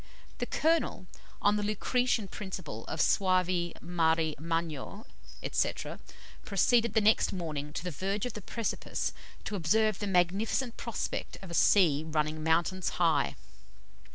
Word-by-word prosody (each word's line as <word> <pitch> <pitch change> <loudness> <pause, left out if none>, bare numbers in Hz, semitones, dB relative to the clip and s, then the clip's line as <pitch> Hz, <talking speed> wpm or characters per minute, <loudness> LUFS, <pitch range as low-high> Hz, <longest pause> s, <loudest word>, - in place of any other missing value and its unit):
The - - -2
Colonel, 320 - +1 0.4
on 205 +1 +4
the - - 0
Lucretian 220 +1 +1
principle 185 - -6
of 160 - -4
"Suave 185 -1 +2
mari 165 -2 +1
magno," 165 - -3 0.5
&c., - - +2 0.7
proceeded 225 +3 +2
the 220 - +5
next 215 +1 +4
morning 155 -5 -4
to 165 - -4
the 180 - -3
verge 195 - -2
of 245 - -4
the 210 - -7
precipice 230 +3 -3 0.3
to 210 - -4
observe 215 +4 +2
the 205 - -2
magnificent 195 +7 +1
prospect 235 - -4
of 185 - -8
a - - -6
sea 165 -5 +4
running 155 0 -1
mountains 170 +3 +1
high. 160 -5 +2
185 Hz, 135 wpm, -30 LUFS, 160-210 Hz, 0.7 s, the